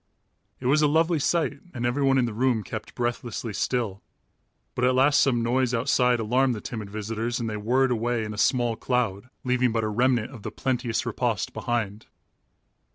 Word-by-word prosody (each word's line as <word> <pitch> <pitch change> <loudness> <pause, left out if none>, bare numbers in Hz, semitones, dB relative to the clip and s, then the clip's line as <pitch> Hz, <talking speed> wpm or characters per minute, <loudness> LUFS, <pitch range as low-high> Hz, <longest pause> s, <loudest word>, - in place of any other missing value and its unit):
It 130 - -9
was 145 +4 +4
a 150 - +5
lovely 160 +2 +2
sight 145 -1 0 0.2
and 120 -1 -2
everyone 135 +2 +2
in 125 - +3
the 115 - -3
room 120 -1 +1
kept 110 +1 -7
breathlessly 120 -2 -3
still, 110 -4 -1 0.7
but 125 - -2
at 125 0 +4
last 140 +3 +4
some 120 -4 +3
noise 125 +1 +1
outside 125 0 +2
alarmed 125 +3 +2
the - - -5
timid 110 -2 -6
visitors 110 +3 -3
and 115 - -2
they 110 - -3
whirred 125 +5 +2
away 120 0 0
in 105 0 -5
a - - -8
small 120 0 +2
cloud, 120 -3 -1
leaving 125 -1 +2
but 115 0 0
a 110 - 0
remnant 120 +1 +1
of 120 -6 -10
the - - -4
plenteous 120 -3 -2
repast - - -1
behind. 110 -3 -3
120 Hz, 185 wpm, -26 LUFS, 115-130 Hz, 0.7 s, a